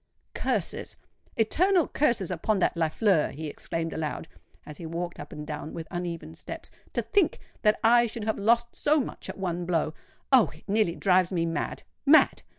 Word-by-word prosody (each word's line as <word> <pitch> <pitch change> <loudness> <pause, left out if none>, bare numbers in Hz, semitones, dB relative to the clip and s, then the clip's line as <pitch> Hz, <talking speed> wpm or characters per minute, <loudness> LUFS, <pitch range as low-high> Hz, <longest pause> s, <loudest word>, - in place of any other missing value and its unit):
"Curses—eternal 345 - -1
curses 230 - +1
upon 190 +5 0
that 185 - +1
Lafleur!" 165 +1 +2
he 160 +2 -6
exclaimed 165 +2 -3
aloud, 160 +1 -3 0.4
as 150 -1 -9
he 170 - -8
walked 170 +2 -4
up 145 - -8
and 150 - -7
down 150 0 -6
with 160 -1 -6
uneven 170 -3 -4
steps. 165 - -9 0.2
"To - - 0
think 400 -7 +2 0.2
that 210 -1 +3
I 235 +1 +6
should 225 0 -6
have 220 0 -1
lost 235 +3 +2
so 300 +1 +3
much 260 - -5
at - - -6
one 180 -2 -2
blow! 165 -3 0 0.4
Oh! 245 - +6
it 155 - -17
nearly 205 -4 +2
drives 185 -2 +3
me 170 -3 +1
mad—mad! 275 - +2
180 Hz, 165 wpm, -27 LUFS, 165-225 Hz, 0.4 s, I